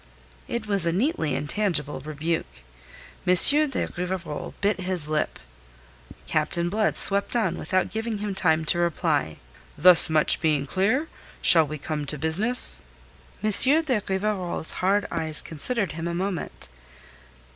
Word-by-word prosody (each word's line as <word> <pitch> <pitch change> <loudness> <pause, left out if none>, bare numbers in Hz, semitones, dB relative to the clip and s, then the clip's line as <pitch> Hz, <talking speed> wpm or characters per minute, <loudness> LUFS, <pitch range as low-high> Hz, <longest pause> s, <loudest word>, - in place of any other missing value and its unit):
It 235 -2 -5
was 200 -5 0
a - - +1
neatly 175 - -1
intangible 150 -4 -2
rebuke. 150 - -5 0.6
M. 180 - +4
de 290 - +4
Rivarol 180 -4 -6
bit 200 -1 -1
his 180 -4 +1
lip. 155 0 -2 0.9
Captain 170 +3 -2
Blood 215 +3 0
swept 200 +4 +4
on 235 - 0
without 185 -2 -2
giving 220 0 -4
him 205 -1 -5
time 160 -4 +1
to 175 - +2
reply: 160 - -1 0.4
"Thus 180 -1 +7
much 155 -1 +2
being 150 -3 0
clear, 220 - -1 0.3
shall 160 -3 +5
we 155 +1 -6
come 150 0 -5
to 150 - -1
business?" 195 - +2 0.6
M. 215 - 0 0.3
de 255 -9 -1
Rivarol's 190 -4 -2
hard 200 +2 -1
eyes 160 -2 0
considered 195 - -1
him 165 +1 -6
a 170 - -4
moment. 180 - -5
175 Hz, 135 wpm, -24 LUFS, 155-205 Hz, 0.9 s, Thus